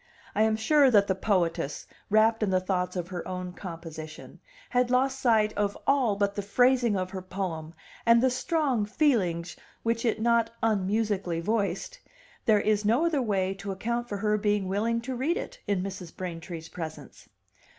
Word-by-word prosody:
I - - +1
am 220 0 +3
sure 275 +5 +4
that 205 -4 +5
the 190 - +1
poetess, 180 -7 -1 0.2
wrapped 220 +2 +4
in 210 - +1
the 185 -1 +3
thoughts 185 -1 -1
of 175 -1 -3
her 180 -2 -5
own 180 -1 -5
composition, 165 -4 -9 0.3
had 250 0 +2
lost 265 +2 +2
sight 220 -4 +3
of 205 -1 -1
all 260 -7 +3
but 200 0 0
the 205 - -3
phrasing 240 +1 +3
of 185 0 -3
her 190 -1 -5
poem 175 -4 -5 0.3
and 230 0 +6
the 260 +1 +3
strong 270 - 0
feelings 185 - +1 0.3
which 230 0 0
it 230 -2 +1
not 230 0 +3
unmusically 205 -4 0
voiced; 205 - -2 0.5
there 210 -2 +5
Is 210 0 +1
no 235 +10 +3
other 315 -5 +1
way 195 -5 0
to 195 +1 -6
account 235 +5 -3
for 205 - -3
her 210 +1 +1
being 205 -2 +1
willing 225 +4 0
to 255 +2 -4
read 290 +8 0
it - - -6
in 195 -3 0
Mrs. 190 -3 -7
Braintree's 165 -2 -6
presence. 160 -2 -8
205 Hz, 175 wpm, -28 LUFS, 185-235 Hz, 0.5 s, and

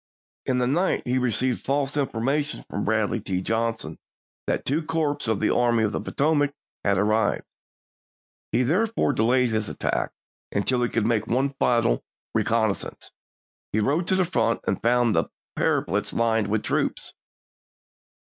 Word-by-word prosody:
In 130 - +2
the 125 - +2
night 170 +9 +1
he 125 +1 +1
received 125 +1 0
false 140 +1 0
information 140 +2 -1
from 100 - -3
Bradley 110 +1 +1
T. 95 -2 -2
Johnson 115 -5 -2 0.5
that - - -1
two 145 +5 +1
corps 155 -4 -1
of 110 -3 +1
the 110 - +2
Army 120 -2 +3
of 105 - +1
the - - -2
Potomac 145 -1 +1 0.3
had 100 -1 +2
arrived. 105 +1 +1 1.1
He 125 - +2
therefore 195 - +1
delayed 125 +2 +2
his 110 -1 -1
attack - - -1 0.4
until 125 +5 +1
he 120 - +1
could 115 -2 0
make 110 -2 +1
one 135 +4 +1
final 115 - +2 0.3
reconnaissance; 110 -3 0 0.6
he 110 - +1
rode 150 - +1
to 190 - +3
the 185 -1 +3
front, 115 -9 0
and - - -1
found 120 -1 +3
the - - +2 0.3
parapets - - 0
lined 115 -2 +1
with 105 +1 0
troops. - - -1
120 Hz, 150 wpm, -25 LUFS, 110-140 Hz, 1.1 s, Army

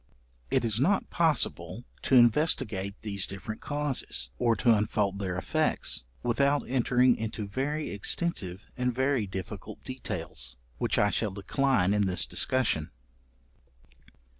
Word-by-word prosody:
It - - +2
is 110 -1 0
not 190 +9 +1
possible 135 - +1 0.2
to 135 - +2
investigate 115 -6 +3
these 100 -3 -2
different 105 +3 -7
causes, 145 - -1
or 115 -2 +3
to 115 +3 +4
unfold 105 -2 0
their 95 -3 -2
effects, 75 - 0 0.2
without 140 +4 +2
entering 125 0 +3
into 110 -1 -4
very 145 +8 -2
extensive 100 - -1
and 125 0 0
very 130 -3 +1
difficult 95 -1 -7
details, - - -5 0.2
which - - +1
I 105 0 +3
shall 110 - 0
decline 100 +1 +1
in 105 -1 +2
this 90 -3 +1
discussion. 125 -12 +1
110 Hz, 125 wpm, -29 LUFS, 100-130 Hz, 0.2 s, to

